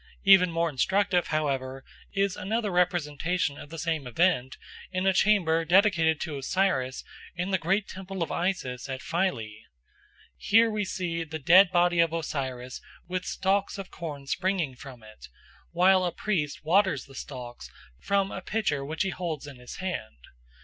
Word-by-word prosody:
Even 195 Hz, -2 st, +7 dB
more 165 Hz, +1 st, +1 dB
instructive, 180 Hz, +5 st, +1 dB
however, 135 Hz, -3 st, -2 dB, 0.3 s
is 195 Hz, -1 st, 0 dB
another 215 Hz, +2 st, -2 dB
representation 175 Hz, -3 st, 0 dB
of 145 Hz, -, -10 dB
the 165 Hz, -, -8 dB
same 160 Hz, -4 st, -2 dB
event 130 Hz, -1 st, +1 dB, 0.3 s
in 185 Hz, 0 st, -1 dB
a 190 Hz, -, +4 dB
chamber 175 Hz, -5 st, +3 dB
dedicated 175 Hz, -3 st, +3 dB
to 150 Hz, -4 st, -4 dB
Osiris 135 Hz, -4 st, 0 dB, 0.3 s
in 180 Hz, +2 st, -3 dB
the 190 Hz, -, +2 dB
great 195 Hz, +5 st, 0 dB
temple 190 Hz, -1 st, -5 dB
of -, -, -5 dB
Isis 140 Hz, -9 st, -2 dB
at 130 Hz, -1 st, -5 dB
Philae. 120 Hz, -, -2 dB, 0.8 s
Here 225 Hz, +1 st, +4 dB
we 210 Hz, -1 st, -1 dB
see 175 Hz, -3 st, -3 dB
the 160 Hz, 0 st, -6 dB
dead 180 Hz, +6 st, +6 dB
body 175 Hz, -1 st, +3 dB
of 165 Hz, -1 st, +3 dB
Osiris 130 Hz, -6 st, -4 dB, 0.3 s
with 185 Hz, 0 st, -3 dB
stalks 195 Hz, +1 st, 0 dB
of 195 Hz, -1 st, -8 dB
corn 150 Hz, -5 st, -7 dB
springing 180 Hz, -2 st, -1 dB
from 125 Hz, -2 st, -12 dB
it, 110 Hz, 0 st, -13 dB, 0.4 s
while 185 Hz, +2 st, +4 dB
a 175 Hz, -, 0 dB
priest 160 Hz, -7 st, -2 dB
waters 170 Hz, -4 st, +2 dB
the 135 Hz, -, -16 dB
stalks 125 Hz, -3 st, -8 dB, 0.3 s
from 195 Hz, -, 0 dB
a 190 Hz, -, -5 dB
pitcher 185 Hz, -9 st, -1 dB
which 155 Hz, +3 st, -2 dB
he 195 Hz, -, -1 dB
holds 165 Hz, -6 st, -4 dB
in 140 Hz, -3 st, -10 dB
his 125 Hz, 0 st, -10 dB
hand. 175 Hz, -, -5 dB
170 Hz, 160 wpm, -27 LUFS, 140-190 Hz, 0.8 s, Even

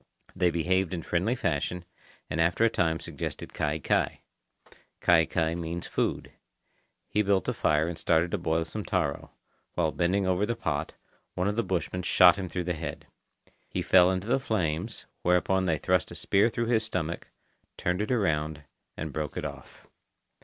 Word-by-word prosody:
They 90 Hz, -1 st, +3 dB
behaved 90 Hz, +2 st, +1 dB
in 85 Hz, -, -5 dB
friendly 95 Hz, +8 st, 0 dB
fashion, 90 Hz, -, -2 dB, 0.4 s
and 80 Hz, -, -1 dB
after 85 Hz, +7 st, +3 dB
a 115 Hz, -, +3 dB
time 80 Hz, -2 st, +1 dB
suggested -, -, -6 dB
kai 80 Hz, 0 st, -1 dB
kai. 75 Hz, -, 0 dB, 0.8 s
Kai 80 Hz, -2 st, +5 dB
kai 80 Hz, -2 st, 0 dB
means 85 Hz, 0 st, -4 dB
food. -, -, -2 dB, 0.8 s
He 105 Hz, -, +1 dB
built 100 Hz, -4 st, +1 dB
a -, -, +1 dB
fire 75 Hz, +1 st, +2 dB
and 85 Hz, -1 st, -5 dB
started 85 Hz, +1 st, +2 dB
to -, -, -1 dB
boil 80 Hz, -1 st, 0 dB
some 105 Hz, +6 st, -5 dB
taro. 85 Hz, -9 st, -1 dB, 0.5 s
While 80 Hz, -3 st, +1 dB
bending 95 Hz, +4 st, +1 dB
over 95 Hz, +1 st, +1 dB
the 120 Hz, -, -1 dB
pot, 80 Hz, -8 st, -2 dB, 0.4 s
one 90 Hz, +2 st, 0 dB
of 105 Hz, -, 0 dB
the 115 Hz, -, +2 dB
bushmen 90 Hz, -2 st, -2 dB
shot 90 Hz, 0 st, +6 dB
him 95 Hz, -2 st, -5 dB
through 90 Hz, 0 st, -2 dB
the 90 Hz, +1 st, -1 dB
head. 80 Hz, 0 st, -6 dB, 0.6 s
He -, -, -2 dB
fell 90 Hz, -1 st, +6 dB
into 95 Hz, +1 st, -1 dB
the 120 Hz, +4 st, +2 dB
flames, 90 Hz, -12 st, -2 dB, 0.2 s
whereupon 90 Hz, +2 st, +2 dB
they 80 Hz, -4 st, +1 dB
thrust -, -, +1 dB
a -, -, -9 dB
spear 100 Hz, +4 st, +3 dB
through 115 Hz, +1 st, -2 dB
his 115 Hz, -1 st, +2 dB
stomach, 85 Hz, -5 st, -3 dB, 0.5 s
turned 90 Hz, +3 st, 0 dB
it 105 Hz, -, -2 dB
around, 80 Hz, -, 0 dB, 0.3 s
and 80 Hz, -2 st, -5 dB
broke 75 Hz, -2 st, -3 dB
it -, -, -3 dB
off. -, -, -9 dB
90 Hz, 175 wpm, -28 LUFS, 80-95 Hz, 0.8 s, shot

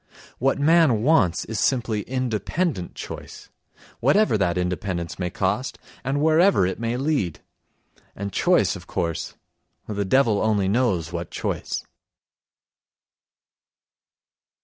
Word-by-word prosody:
What 135 Hz, +2 st, +2 dB
man 145 Hz, -6 st, +4 dB
wants 125 Hz, -, +3 dB
is 110 Hz, -2 st, -4 dB
simply 115 Hz, -4 st, +1 dB
independent 130 Hz, -, -2 dB
choice, -, -, -9 dB, 0.5 s
whatever 150 Hz, -, +3 dB
that 90 Hz, -4 st, +1 dB
independence 90 Hz, -1 st, -3 dB
may 90 Hz, -1 st, -1 dB
cost 125 Hz, +9 st, -1 dB, 0.3 s
and 135 Hz, +3 st, -1 dB
wherever 160 Hz, -, +4 dB
it 95 Hz, -, -3 dB
may 115 Hz, +1 st, -1 dB
lead. 135 Hz, -, -1 dB, 0.7 s
And 100 Hz, -1 st, -5 dB
choice, -, -, +3 dB
of -, -, -11 dB
course, 85 Hz, -2 st, -3 dB, 0.5 s
the 100 Hz, -1 st, -2 dB
devil 115 Hz, 0 st, +3 dB
only 105 Hz, -3 st, +2 dB
knows 95 Hz, -7 st, +1 dB
what 85 Hz, -1 st, -4 dB
choice. -, -, -3 dB
110 Hz, 110 wpm, -24 LUFS, 95-135 Hz, 0.7 s, man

